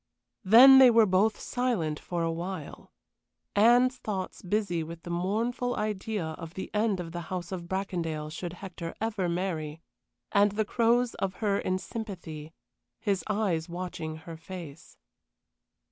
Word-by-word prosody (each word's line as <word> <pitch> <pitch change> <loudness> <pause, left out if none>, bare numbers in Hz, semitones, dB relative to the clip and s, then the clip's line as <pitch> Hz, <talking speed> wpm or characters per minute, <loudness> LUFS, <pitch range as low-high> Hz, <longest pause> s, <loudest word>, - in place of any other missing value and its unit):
Then 255 +7 +9
they 260 -1 +9
were 230 -1 +6
both 200 +3 +2
silent 215 -12 -1
for 175 -1 -3
a 165 - 0
while 175 +3 -6 0.6
Anne's 245 +4 +5
thoughts 195 -6 -4
busy 190 -3 -1
with 165 +1 -8
the 175 - -6
mournful 225 +8 -1
idea 210 -2 -2
of 160 +1 -7
the 190 - -6
end 210 -2 +1
of 165 -2 -5
the 175 +1 -5
House 180 -1 -4
of 175 -2 -5
Bracondale 170 -5 -3
should 175 +2 -5
Hector 175 -2 -7
never 210 -5 -1
marry, 165 -4 -3 0.5
and 205 0 +4
the 215 +1 0
Crow's 235 +2 +2
of 190 -1 -3
her 205 -2 0
in 185 - 0
sympathy, 175 -8 -7 0.5
his 200 -3 0
eyes 195 -6 0
watching 170 -3 -5
her 160 +1 -9
face. 165 -3 -10
185 Hz, 145 wpm, -28 LUFS, 170-215 Hz, 0.6 s, Then